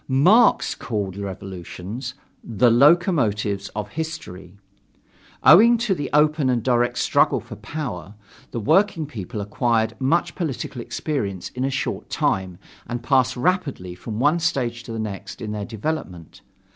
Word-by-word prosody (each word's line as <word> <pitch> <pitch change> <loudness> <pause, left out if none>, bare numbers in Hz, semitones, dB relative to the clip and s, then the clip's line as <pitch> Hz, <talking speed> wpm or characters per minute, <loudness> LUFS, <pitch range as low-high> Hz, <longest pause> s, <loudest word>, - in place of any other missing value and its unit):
Marx 180 - +4
called 100 -6 -4
revolutions 100 +5 -7 0.3
"the 115 +2 +2
locomotives 120 - +3
of 105 -1 -4
history." 100 - -7 0.9
Owing 230 +9 +8
to 225 -3 0
the 145 -6 -4
open 150 -1 +3
and 120 -3 0
direct 120 -1 +1
struggle - - +2
for - - -10
power, 110 - -6 0.3
the 120 - -4
working 175 - +2
people 105 -7 -6
acquire 110 +2 +1
much 140 +6 +1
political 140 -5 -4
experience 110 - -3
in 125 - -4
a 135 - +1
short 135 -1 -3
time 95 -2 -1 0.3
and 120 0 -4
pass 130 -2 +2
rapidly 140 - -1
from 105 +4 -6
one 150 +6 +3
stage 125 -8 -1
to 120 - -9
the 115 - -4
next 100 -2 -6
in 110 -3 -5
their 105 -1 -4
development. 110 - -5
120 Hz, 140 wpm, -22 LUFS, 100-150 Hz, 0.9 s, Owing